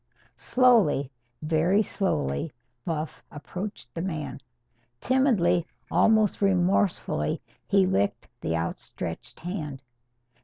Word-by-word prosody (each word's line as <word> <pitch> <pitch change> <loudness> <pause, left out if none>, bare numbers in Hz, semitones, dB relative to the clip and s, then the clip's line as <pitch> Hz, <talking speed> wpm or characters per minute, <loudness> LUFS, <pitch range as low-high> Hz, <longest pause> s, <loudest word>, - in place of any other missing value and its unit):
Slowly, 225 - +3 0.3
very 165 +7 +3
slowly, 70 - -1 0.3
Buff 160 -2 -3
approached 150 -4 -7
the 165 - -3
man. 150 -7 -4 0.6
Timidly, 205 - +2 0.2
almost 215 -2 +4
remorsefully, 185 - +1 0.3
he 95 - +4
licked 95 +2 0
the 80 - 0
outstretched 85 +6 -5
hand. 155 -7 -5
165 Hz, 85 wpm, -27 LUFS, 125-195 Hz, 0.6 s, almost